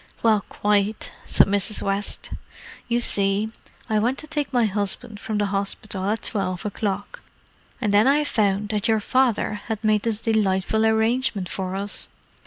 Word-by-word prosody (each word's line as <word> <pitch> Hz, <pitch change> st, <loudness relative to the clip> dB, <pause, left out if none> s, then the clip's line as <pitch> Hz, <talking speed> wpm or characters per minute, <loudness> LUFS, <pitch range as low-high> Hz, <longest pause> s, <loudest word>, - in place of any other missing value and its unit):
"Well, 220 Hz, -3 st, +4 dB
quite," 210 Hz, +1 st, 0 dB, 0.2 s
said -, -, +5 dB
Mrs. 205 Hz, +1 st, +1 dB
West. 195 Hz, +1 st, -1 dB, 0.6 s
"You 240 Hz, 0 st, +1 dB
see, 200 Hz, -1 st, +1 dB, 0.4 s
I 215 Hz, -1 st, +2 dB
went 245 Hz, +5 st, +1 dB
to 310 Hz, -, -7 dB
take 295 Hz, -2 st, -2 dB
my 245 Hz, -3 st, +3 dB
husband 205 Hz, +1 st, -2 dB
from 215 Hz, 0 st, -3 dB
the 205 Hz, -, +1 dB
hospital 200 Hz, 0 st, -3 dB
at 220 Hz, +2 st, -1 dB
twelve 185 Hz, -4 st, -2 dB
o'clock, 205 Hz, -1 st, -3 dB, 0.6 s
and 210 Hz, -4 st, 0 dB
then 210 Hz, +4 st, +5 dB
I 290 Hz, +2 st, +4 dB
found 205 Hz, -6 st, +1 dB
that 210 Hz, +1 st, 0 dB
your 220 Hz, -1 st, +3 dB
father 225 Hz, -2 st, +1 dB
had 220 Hz, -1 st, -3 dB
made 215 Hz, -1 st, +3 dB
this 220 Hz, -2 st, -1 dB
delightful 220 Hz, -1 st, +1 dB
arrangement 220 Hz, -3 st, +1 dB
for 190 Hz, -1 st, -3 dB
us. 200 Hz, +1 st, -2 dB
210 Hz, 160 wpm, -23 LUFS, 200-225 Hz, 0.6 s, said